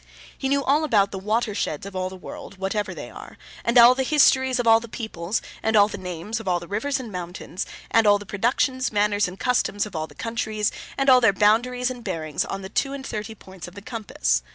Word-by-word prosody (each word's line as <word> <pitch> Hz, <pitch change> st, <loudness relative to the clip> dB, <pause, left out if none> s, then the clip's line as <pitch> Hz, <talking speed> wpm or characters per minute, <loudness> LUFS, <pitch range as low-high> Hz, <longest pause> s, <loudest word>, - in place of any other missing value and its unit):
He 265 Hz, -, -3 dB
knew 280 Hz, 0 st, +2 dB
all 290 Hz, +4 st, +2 dB
about 205 Hz, -9 st, +2 dB
all 190 Hz, -, -4 dB
the -, -, -14 dB
Water 220 Hz, +1 st, 0 dB
Sheds 155 Hz, -4 st, -3 dB
of 200 Hz, -1 st, -9 dB
all 185 Hz, 0 st, -2 dB
the 190 Hz, -, -9 dB
world 190 Hz, +1 st, -10 dB
(whatever 195 Hz, +2 st, -2 dB
they -, -, -8 dB
are), -, -, -11 dB, 0.3 s
and 235 Hz, +1 st, +2 dB
all 240 Hz, +1 st, +9 dB
the 265 Hz, -, -2 dB
histories 260 Hz, -2 st, +3 dB
of 245 Hz, -, 0 dB
all 225 Hz, 0 st, +6 dB
the 235 Hz, -, -9 dB
peoples, 215 Hz, -4 st, -4 dB, 0.2 s
and 220 Hz, 0 st, +1 dB
all 205 Hz, -1 st, +7 dB
the 205 Hz, -, -7 dB
names 180 Hz, +4 st, -5 dB
of 225 Hz, -, -10 dB
all 175 Hz, -1 st, +2 dB
the 170 Hz, -, -10 dB
rivers 265 Hz, +9 st, -1 dB
and 240 Hz, -4 st, -7 dB
mountains, 180 Hz, +1 st, -6 dB, 0.2 s
and 225 Hz, -1 st, +4 dB
all 205 Hz, 0 st, +6 dB
the 205 Hz, -, -10 dB
productions, 255 Hz, +6 st, 0 dB
manners, 205 Hz, -1 st, +2 dB
and 180 Hz, +2 st, -9 dB
customs 230 Hz, -5 st, +1 dB
of 210 Hz, -, -10 dB
all 155 Hz, 0 st, -2 dB
the -, -, -18 dB
countries, 220 Hz, -2 st, -2 dB, 0.3 s
and 275 Hz, -, 0 dB
all 255 Hz, -2 st, +7 dB
their 225 Hz, -4 st, +5 dB
boundaries 245 Hz, +5 st, +2 dB
and 245 Hz, -2 st, -8 dB
bearings 160 Hz, -6 st, -2 dB
on 195 Hz, 0 st, -5 dB
the -, -, -5 dB
two 275 Hz, +6 st, -1 dB
and 275 Hz, -1 st, -6 dB
thirty 215 Hz, -1 st, -5 dB
points 190 Hz, -4 st, -11 dB
of 175 Hz, -, -13 dB
the 200 Hz, -, -9 dB
compass. 225 Hz, -2 st, -1 dB
215 Hz, 245 wpm, -24 LUFS, 195-245 Hz, 0.3 s, all